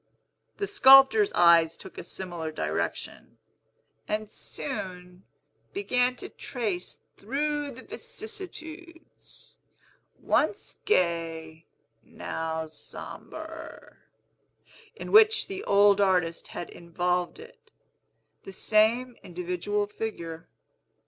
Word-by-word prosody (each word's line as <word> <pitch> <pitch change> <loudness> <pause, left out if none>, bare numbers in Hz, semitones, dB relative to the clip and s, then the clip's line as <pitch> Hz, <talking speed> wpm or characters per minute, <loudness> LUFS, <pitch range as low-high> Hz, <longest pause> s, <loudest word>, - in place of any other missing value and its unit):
The 405 - -1
sculptor's 400 +3 +7
eyes 170 -2 +5
took 190 - -12
a - - -6
similar 175 -3 -5
direction, 85 - -4 0.7
and 215 0 -2
soon 180 -8 -6 0.5
began 250 -10 +1
to - - -7
trace 210 -8 -4 0.2
through 290 +5 -2
the 260 -1 -10
vicissitudes, 375 -7 -8 0.6
once 425 - 0
gay, 165 - 0 0.3
now 160 0 -4
sombre, 155 0 -10 1.0
in - - -7
which 435 +1 +6
the 390 +1 -5
old 205 0 +5
artist 180 -4 +1
had 175 - -7
involved 175 - -2
it, 465 +3 -15 0.7
the 195 - -9
same 230 +5 +2
individual 180 +3 -2
figure. 170 -6 -6
205 Hz, 90 wpm, -27 LUFS, -, 1.0 s, sculptor's